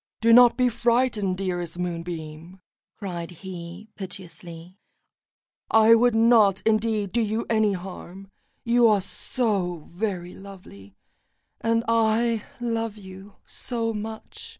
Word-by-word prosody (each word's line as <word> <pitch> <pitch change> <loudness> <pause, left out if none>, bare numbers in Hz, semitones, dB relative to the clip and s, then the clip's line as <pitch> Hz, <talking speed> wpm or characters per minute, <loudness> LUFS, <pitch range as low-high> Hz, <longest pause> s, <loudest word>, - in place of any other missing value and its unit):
"Do 230 +1 +4
not 245 0 +7
be 250 -1 +3
frightened, 235 -5 +1
dearest 175 -3 -3
Moonbeam," 170 0 -6 0.4
cried 175 -4 -6
he 180 +2 -9
piteously; 180 -2 -9 0.9
"I 220 +1 +6
would 235 0 +4
not, 225 -4 +5
indeed, 215 -2 +1
do 235 - +1
you 220 +1 -1
any 215 -2 +2
harm, 190 +1 -9 0.3
you 240 0 +4
are 210 -2 +4
so 190 - -2
very 180 -2 -3
lovely, 180 - -13 0.6
and 230 0 +1
I 230 0 +2 0.2
love 230 -2 -2
you 190 0 -12
so 230 -2 -3
much." 220 +1 -7
205 Hz, 115 wpm, -24 LUFS, 180-230 Hz, 0.9 s, not